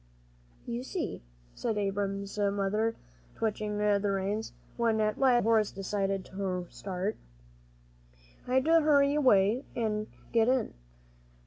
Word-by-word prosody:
"You 240 0 -3
see," 325 +6 -4 0.3
said 215 - -2
Abram's 200 0 -2
mother, 205 +2 +1 0.4
twitching 210 -1 -2
the 210 -1 +2
reins, 200 +2 -1 0.2
when 230 -2 +1
at 215 0 0
last 265 -2 +5
the - - +5
old 240 - +3
horse 220 -1 +3
decided 195 0 -2
to 185 -2 -3
start, 195 +2 -3 1.3
"I 250 - 0
had 260 +1 +3
to 330 +1 +5
hurry 285 -2 +4
away 245 -4 +4
an' 215 -2 -1 0.2
get 225 -1 +3
in. 255 -1 +1
210 Hz, 130 wpm, -30 LUFS, 200-240 Hz, 1.3 s, last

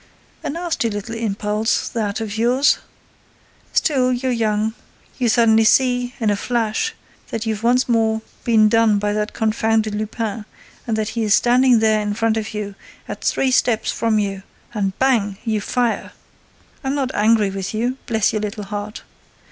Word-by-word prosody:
—A - - -3
nasty 335 -6 -1
little 205 +2 -5
impulse, 215 -1 -1
that, 210 -3 -2
of 220 -2 -4
yours!—Still, 255 +2 -1
you're 255 +1 -1
young, 220 -2 0 0.5
you 245 -2 +2
suddenly 225 -1 +4
see—in 245 -1 +2
a - - +2
flash!—that 230 - -3
you've 220 -1 -2
once 245 +2 +2
more 220 -2 +1 0.2
been 220 -2 +4
done 225 -1 +3
by 205 0 -1
that 210 0 -2
confounded 220 0 0
Lupin 215 0 -3 0.4
and 225 -1 0
that 215 0 -1
he 230 - -3
is 210 -2 +4
standing 250 0 +4
there 220 -1 +3
in 205 0 -2
front 225 0 +1
of 220 -1 -3
you, 205 -1 -4 0.3
at - - -7
three 265 - +1
steps 240 -3 +2
from 225 -2 0
you—and 195 0 -4
bang! 225 -7 +1
You 220 -2 0
fire!—I'm 250 +3 -4
not 270 -3 -1
angry 210 -1 +3
with 190 -1 -4
you, 240 +4 -1
bless 220 -2 +1
your 215 - -1
little 210 0 -4
heart! 205 +1 -6
220 Hz, 150 wpm, -20 LUFS, 210-240 Hz, 0.5 s, suddenly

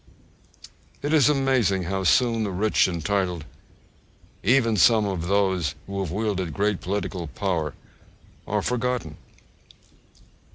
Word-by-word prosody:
It 145 +2 -1
is 150 -2 +5
amazing 130 -9 +2
how 95 +2 -2
soon 115 +5 +3
the 105 - -2
rich 100 +3 +2
and 85 -3 -4
titled, 95 -5 0 1.0
and 105 - +2
even 120 -4 +3
some 110 +2 +5
of 90 -4 -3
those 95 -6 +1
who 100 0 -5
have 95 -6 -3
wielded 95 -4 -2
great 105 -1 0
political 95 -3 -3
power, 80 -1 -2 0.7
are - - -1
forgotten. 125 -10 -2
100 Hz, 125 wpm, -24 LUFS, 90-115 Hz, 1.0 s, is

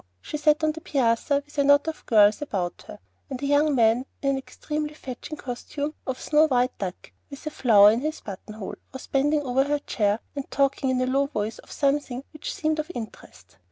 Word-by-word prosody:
she 300 - -7
sat 300 +1 +3
on 310 - +3
the 320 +1 -9
piazza 275 +1 +1
with 295 - -18
a - - +5
knot 285 +2 +5
of 320 - -4
girls 210 0 +5
about 190 -11 -3
her, - - -9 0.3
and 265 - -5
a 280 - -3
young 290 +1 +3
man 230 +1 +4 0.2
in 275 - +3
an 270 - 0
extremely 300 +2 -5
"fetching" 265 +2 -7
costume 285 +4 -5
of 260 -1 -3
snow 310 +1 +4
white 250 -2 +1
duck, 185 -2 -6 0.2
with 280 0 -10
a 305 - -3
flower 210 -7 +6
in 225 - 0
his 310 +2 -3
button 205 +1 -8
hole, 210 -3 -6 0.2
was 265 - -8
bending 290 +2 +1
over 260 0 +2
her 295 +1 +1
chair, 210 -7 0 0.2
and 280 -1 -5
talking 275 -1 +1
in 255 -1 +1
a - - +2
low 275 +2 +1
voice 215 -5 -3
of - - -15
something 275 -2 0
which 305 - -5
seemed 310 0 -1
of 310 +2 -3
interest. 225 -3 -10
275 Hz, 215 wpm, -25 LUFS, 240-295 Hz, 0.3 s, flower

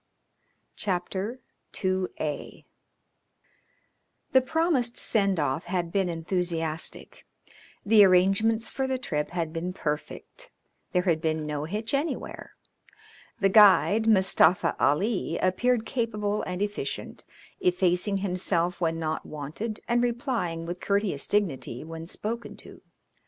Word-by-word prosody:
CHAPTER 195 +5 -3 0.4
II 185 -5 -3 1.7
The 260 - +6
promised 285 -5 +1
send 200 -5 +2
off 145 +1 -1
had 175 -2 -2
been 190 -1 +1
enthusiastic. 165 -1 -2 0.6
The 210 0 +7
arrangements 200 +5 +3
for 265 -1 -1
the 260 0 -1
trip 150 -12 -2
had 165 -3 -3
been 175 +2 -3
perfect; 175 - -5 0.4
there 180 -1 +2
had 165 -4 +1
been 160 -1 -1
no 150 0 -3
hitch 215 - -3
anywhere. 285 +4 -3 0.9
The 195 - +4
guide, 210 +2 +6
Mustafa 190 -4 +4
Ali, 190 +9 +1
appeared 225 +5 +1
capable 210 -4 -1
and 180 +2 -2
efficient, 205 0 -4 0.4
effacing 200 - +1
himself 180 -1 0
when 165 -1 +1
not 160 -1 -2
wanted 155 +10 -6
and 240 0 +2
replying 235 - -1
with 175 +2 -6
courteous 200 -8 0
dignity 155 - -1
when 165 +1 -8
spoken 230 +5 -4
to. - - -13
190 Hz, 115 wpm, -27 LUFS, 165-225 Hz, 1.7 s, The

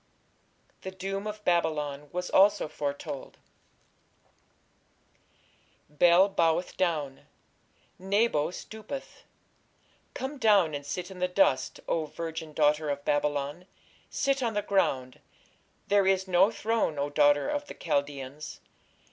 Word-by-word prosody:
The 190 - -5
doom 195 +2 -4
of 210 0 -7
Babylon 150 -4 0
was 180 0 -4
also 200 -2 +4
foretold: 140 -2 -5 2.5
Bel 175 +5 +5
boweth 170 -2 +1
down, 150 -7 -2 0.7
Nebo 195 -4 +1
stoopeth.... 220 +8 -9 0.9
Come 270 +2 -5
down, 200 -9 +4
and 145 0 -4
sit 180 +4 -4
in 185 - -10
the 180 - +1
dust, 180 -7 +1
O 160 -2 0
virgin 160 0 -6
daughter 150 0 +2
of 140 0 -3
Babylon, 145 +3 -1 0.4
sit 275 -1 0
on 230 -3 -1
the 205 - 0
ground: 130 -11 0 0.7
there 200 -1 +3
is 190 0 +2
no 185 +2 +5
throne, 225 -8 -1
O 140 +1 -2
daughter 145 0 +4
of 295 0 -2
the - - -9
Chaldeans.... 140 -1 -3
175 Hz, 115 wpm, -28 LUFS, 145-200 Hz, 2.5 s, Bel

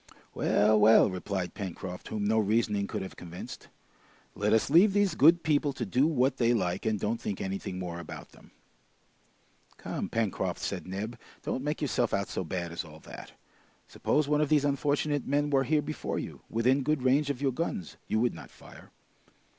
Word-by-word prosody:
"Well, 105 +1 +3
well!" 105 -1 +6
replied 90 -1 -3
Pencroft, 95 -2 -6
whom 105 -1 -3
no 110 +2 +3
reasoning 105 -1 +1
could - - -4
have 95 - -8
convinced. 90 +1 -9 0.7
"Let 105 +1 0
us 110 +4 +2
leave 190 +6 +6
these 205 -3 +2
good 165 +3 +5
people 145 -2 +1
to 125 -3 -4
do 125 +9 +2
what 135 -4 +1
they 120 0 +3
like, 90 0 -1
and 110 -2 0
don't 115 +4 -2
think 100 - -3
anything 95 -1 -4
more 90 -2 -5
about 85 - -9
them!" - - -18 1.3
"Come, - - -4
Pencroft," 110 -4 -1
said - - -4
Neb, 100 +5 -5 0.2
"don't 130 - -2
make 150 +1 -2
yourself 125 -5 +1
out 100 0 -2
so - - -3
bad 85 0 -4
as 85 - -4
all 80 -2 -13
that! - - -11 0.5
Suppose 150 -1 0
one 150 0 +2
of 150 - +1
these 150 -2 +3
unfortunate 145 0 0
men 145 +1 +1
were 135 -1 +3
here 150 +2 +2
before 155 +1 -4
you, - - -6
within 125 +5 +2
good 150 -1 0
range 140 +3 +3
of 140 -3 -2
your 140 -1 +1
guns, 125 - -4
you 110 - +1
would 120 - +2
not 80 -3 -10
fire." - - -15
115 Hz, 185 wpm, -29 LUFS, 100-145 Hz, 1.3 s, well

